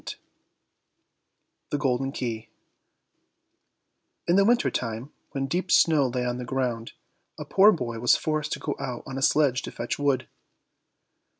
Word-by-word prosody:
200 - - -7 1.5
The 145 - -1
Golden 135 -1 0
Key 115 -4 -4 1.8
In 175 - +3
the 200 - +5
winter 240 +4 +3
time, 115 +3 -4 0.2
when 135 -1 -3
deep 180 +7 -2
snow 150 -5 +5
lay 125 0 -2
on 125 0 -2
the - - -4
ground, 120 -2 -3 0.4
a - - -6
poor 200 +3 +6
boy 120 - -3
was 120 +1 +4
forced 155 -1 -2
to - - -4
go 145 - -3
out 125 -2 -5
on 135 -2 -5
a - - -6
sledge 140 -2 +3
to - - -7
fetch 120 - -4
wood. 135 -3 +1
135 Hz, 155 wpm, -26 LUFS, 125-150 Hz, 1.8 s, poor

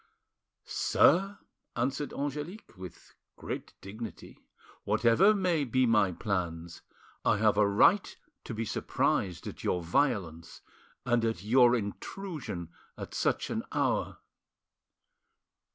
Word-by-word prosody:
"Sir," 195 +4 +3 0.4
answered 135 +4 -2
Angelique, 145 - -5
with 90 -2 -11 0.2
great - - -7
dignity, 110 +3 -9 0.4
"whatever 120 - +4
may 180 -6 +1
be 130 0 +2
my 105 -5 +3
plans, 85 -4 -4 0.4
I - - +3
have 105 0 +3
a 105 0 +4
right 110 - +3 0.3
to 115 - -6
be 115 +1 -2
surprised 90 -3 -1
at - - -8
your 90 - 0
violence 85 - -1 0.4
and 120 -1 +2
at 110 -6 -1
your 120 +2 +5
intrusion 115 - -5 0.3
at - - -8
such - - 0
an - - -1
hour." - - 0
115 Hz, 110 wpm, -30 LUFS, 95-145 Hz, 0.4 s, your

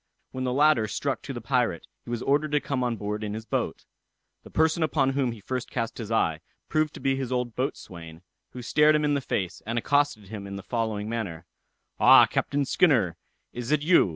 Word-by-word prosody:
When 130 0 -4
the 125 - 0
latter 140 -4 +4
struck - - -2
to - - -7
the - - -6
pirate, - - 0 0.2
he - - -10
was 120 -1 -3
ordered 145 +2 +1
to 150 - +4
come 135 -3 -2
on 120 -2 0
board 105 +1 -4
in 105 0 -3
his 110 0 -7
boat. - - -3 0.6
The - - -13
person 160 +1 +2
upon 140 -4 +2
whom 135 -3 0
he 115 - -9
first 125 +4 -4
cast 115 -1 -3
his 115 -1 -6
eye, 80 -8 +1 0.3
proved 155 -1 0
to - - -8
be 135 0 +1
his 135 -2 -4
old 125 -2 -2
boatswain, 85 - -5 0.3
who 125 - -9
stared 150 +5 +4
him 150 0 +1
in 145 - +2
the 140 - 0
face, 95 -8 -3
and 115 +2 -3
accosted 140 -5 +1
him 100 -2 -7
in 100 - -6
the 100 - -7
following 110 -3 -2
manner: 110 -8 -4 0.5
"Ah, - - +8
Captain 140 0 -1
Skinner, 125 - +3 0.4
is 120 0 -5
it 150 -1 +2
you? 170 - +5
125 Hz, 215 wpm, -26 LUFS, 110-145 Hz, 0.6 s, Ah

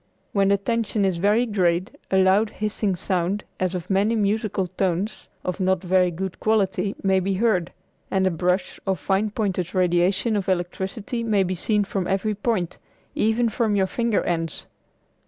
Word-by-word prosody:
When 195 -1 +2
the 200 0 +4
tension 215 0 0
is 185 -3 +1
very 210 +7 +3
great 185 -4 +1 0.2
a 190 - +2
loud 190 +3 +4
hissing 210 -2 -2
sound 185 +2 -1 0.2
as 185 0 0
of 180 -1 -5
many 205 +4 +2
musical 210 -2 0
tones 185 +2 -2 0.2
of 180 +1 -2
not 190 -1 +1
very 180 0 +3
good 185 +2 -5
quality 200 -2 +1
may 190 -1 +3
be 190 +1 -1
heard, 190 -5 +1 0.4
and 190 -1 +1
a 185 - +3
brush 180 +3 -1
or 190 - +2
fine 195 +5 0
pointed 195 -4 -2
radiation 185 +5 +2
of 195 -2 -1
electricity 190 +6 -2
may 210 -4 +2
be 185 0 -2
seen 205 +3 +1
from 190 -2 -2
every 195 +3 0
point, 200 -4 -2 0.3
even 225 +2 +2
from 220 -1 0
your 195 -1 +3
finger 230 +2 0
ends. 165 -2 -1
195 Hz, 170 wpm, -24 LUFS, 185-210 Hz, 0.4 s, the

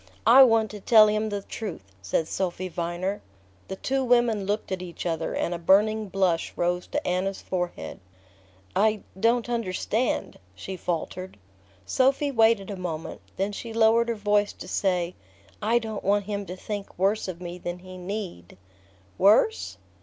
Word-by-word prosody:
"I 240 +5 +9
want 225 -4 +5
to 210 - -8
tell 215 +2 +7
him 215 +1 0
the 205 -1 -3
truth," 175 - -7
said 100 - -1
Sophy 185 0 -2
Viner. 175 +3 -3 0.5
The 190 - -5
two 265 +6 -1
women 240 -5 +2
looked 205 0 -2
at 185 -1 -2
each 175 -1 -7
other, 165 -2 -2
and 175 - -1
a 170 - -4
burning 210 +4 +3
blush 185 -3 +1
rose 175 +1 -1
to - - -3
Anna's 185 +2 -1
forehead. 180 -1 -4 0.8
"I 215 0 +2 0.2
don't 230 +2 +2
understand," 230 +1 -1 0.2
she 190 - -6
faltered. 180 - -4 0.5
Sophy 275 +2 +2
waited 225 -4 +3
a - - -4
moment; 170 -4 -5 0.2
then 195 +2 0
she 225 +3 -7
lowered 230 +1 +4
her 235 - 0
voice 205 -1 +1
to - - -10
say: 180 -2 0 0.5
"I 225 +3 +3
don't 220 -3 -4
want 200 +1 +2
him 200 -1 -4
to 180 - -5
think 205 +1 -6
worse 195 +4 +1
of 180 -2 -5
me 175 0 -7
than 175 0 -4
he 185 +1 -11
need..." 180 - -6 0.6
"Worse?" 220 - +3
200 Hz, 160 wpm, -26 LUFS, 180-220 Hz, 0.8 s, I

